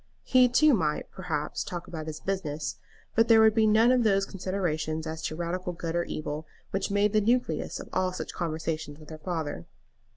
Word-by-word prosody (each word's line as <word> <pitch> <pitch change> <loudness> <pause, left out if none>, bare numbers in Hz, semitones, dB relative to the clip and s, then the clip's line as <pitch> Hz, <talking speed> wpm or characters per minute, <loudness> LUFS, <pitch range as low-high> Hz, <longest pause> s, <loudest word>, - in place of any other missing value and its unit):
He 255 -1 +5
too 300 +4 +5
might, 155 -9 0
perhaps, 165 -6 -3
talk 175 -1 -6
about 160 -2 -6
his 155 0 -6
business; 160 -6 -3 0.3
but 225 +1 +4
there 225 -1 +7
would 220 -1 +6
be 220 -1 +4
none 220 +3 +5
of 255 -1 +4
those 195 -3 +3
considerations 175 -5 -2
as 160 0 -5
to 155 - -2
radical 175 +2 -3
good 165 -1 -4
or 175 - +1
evil 155 0 -4 0.2
which 195 0 -1
made 205 +1 +2
the 215 - +4
nucleus 225 -8 0
of - - -8
all 185 0 +1
such 185 - -6
conversations 160 -3 -3
with 155 0 -13
her 155 - -8
father. 155 - -4
180 Hz, 195 wpm, -28 LUFS, 155-210 Hz, 0.3 s, there